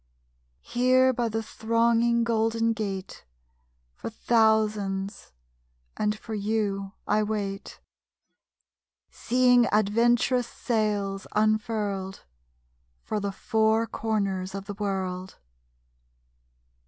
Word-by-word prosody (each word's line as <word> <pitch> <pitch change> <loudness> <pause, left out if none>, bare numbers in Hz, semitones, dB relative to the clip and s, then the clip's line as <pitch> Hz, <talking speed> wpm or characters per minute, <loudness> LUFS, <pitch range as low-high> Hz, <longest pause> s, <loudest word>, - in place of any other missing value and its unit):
Here 255 +1 +3
by 240 -1 -1
the 225 +1 -2
thronging 230 +1 +2
Golden 230 0 +1
Gate 195 -3 -5 0.7
For - - -6
thousands 215 -3 +1 0.6
and 210 0 0
for 220 - -8
you 200 -2 -1
I 215 - +2
wait, 205 -2 -4 1.3
Seeing 245 0 +3
adventurous 235 +4 +2
sails 205 -3 -1
unfurled 210 -3 -1 0.8
For 215 - -2
the 200 -1 -2
four 220 +2 +1
corners 200 -5 -2
of 195 0 -6
the 205 - -5
world. 190 -2 -3
215 Hz, 85 wpm, -26 LUFS, 200-230 Hz, 1.3 s, Here